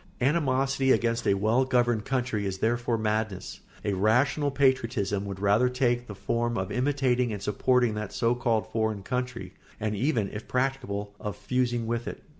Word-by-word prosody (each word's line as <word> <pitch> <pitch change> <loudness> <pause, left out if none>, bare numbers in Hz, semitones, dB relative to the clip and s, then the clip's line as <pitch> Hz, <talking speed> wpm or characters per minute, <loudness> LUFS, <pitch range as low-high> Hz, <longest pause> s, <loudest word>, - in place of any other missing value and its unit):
Animosity 135 -1 +2
against 115 -1 +1
a 100 - +4
well 110 +6 +2
governed 120 -4 +1
country 120 -6 -1
is 95 -1 -3
therefore 120 +2 0
madness. 110 -3 -2 0.3
A 105 - +1
rational 125 +9 +2
patriotism 125 -7 +1
would 100 -1 -6
rather 105 +5 +3
take 120 -1 0
the 105 - -7
form 120 +3 -1
of 95 0 -3
imitating 125 -2 +1
and 105 - -4
supporting 125 +2 +2
that 105 -1 -4
so 115 0 +1
called 120 -3 0
foreign 110 -3 -1
country, 125 -5 -4 0.3
and 105 -1 -1
even, 115 -2 +1
if 105 +1 -7
practicable, 125 -6 -2
of 105 -1 -4
fusing 120 0 -1
with 120 +1 -2
it. - - -6
120 Hz, 165 wpm, -27 LUFS, 105-125 Hz, 0.3 s, a